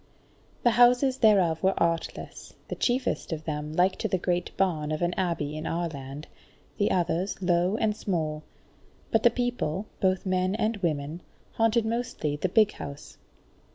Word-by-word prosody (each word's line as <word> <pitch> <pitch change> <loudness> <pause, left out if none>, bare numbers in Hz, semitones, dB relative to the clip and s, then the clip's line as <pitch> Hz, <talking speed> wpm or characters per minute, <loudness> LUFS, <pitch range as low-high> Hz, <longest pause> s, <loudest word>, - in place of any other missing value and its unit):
The 240 - +5
houses 245 +3 +4
thereof 185 -8 +4
were 190 +1 +2
artless, 165 -1 -2
the - - -3
chiefest 250 -4 -1
of 160 -1 -3
them 150 -1 -3
like 180 +4 +2
to - - -1
the 185 - 0
great 175 0 -1
barn 160 -6 0
of 155 +2 -1
an 175 +1 +1
abbey 165 -6 -2
in 155 +1 -4
our 170 +1 -1
land, 140 0 -8 0.5
the 205 - +3
others 180 +2 0
low 180 +2 +2
and 215 -2 +1
small; 160 -7 -2 0.7
but - - +3
the - - +6
people, 245 -7 -2
both 185 -1 +1
men 185 +1 +1
and 220 +1 0
women, 160 -2 -2 0.3
haunted 225 0 +2
mostly 225 -10 -2
the 180 +5 -1
big 210 +2 +4
house. 140 +1 -9
180 Hz, 160 wpm, -27 LUFS, 155-215 Hz, 0.7 s, the